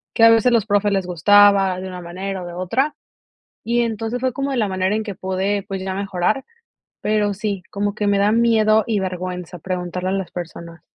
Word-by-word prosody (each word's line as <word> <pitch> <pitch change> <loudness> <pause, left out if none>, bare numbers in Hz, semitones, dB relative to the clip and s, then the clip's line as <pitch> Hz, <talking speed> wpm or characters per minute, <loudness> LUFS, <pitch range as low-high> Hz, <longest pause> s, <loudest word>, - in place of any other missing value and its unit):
que 225 - +3
a 230 - +9
veces 225 +2 +4
los 225 -3 +3
profes 205 0 +2
les 195 -2 0
gustaba 195 +1 +4
de 190 - -6
una 180 -1 -7
manera 185 +2 -5
o 175 - -7
de 175 - -8
otra. 230 - -1 0.7
Y 240 +1 +1
entonces 225 +1 -2
fue 260 -1 +1
como 275 +1 -3
de 260 - -1
la 210 -4 +1
manera 190 +2 0
en 220 - -1
que 205 -4 -6
pude, 190 +2 -1
pues, 195 -2 -4
ya 190 0 -3
mejorar. 200 +5 -1 0.6
Pero 210 -1 +1
sí, 205 -2 -3
como 205 0 -2
que 210 -1 -2
me 200 0 +3
da 205 +1 +3
miedo 220 -2 +4
y 215 -3 +1
vergüenza 180 -2 -5
preguntarle 180 +1 -3
a - - -1
las 195 -2 -3
personas. 170 -2 -8
200 Hz, 215 wpm, -20 LUFS, 185-215 Hz, 0.7 s, a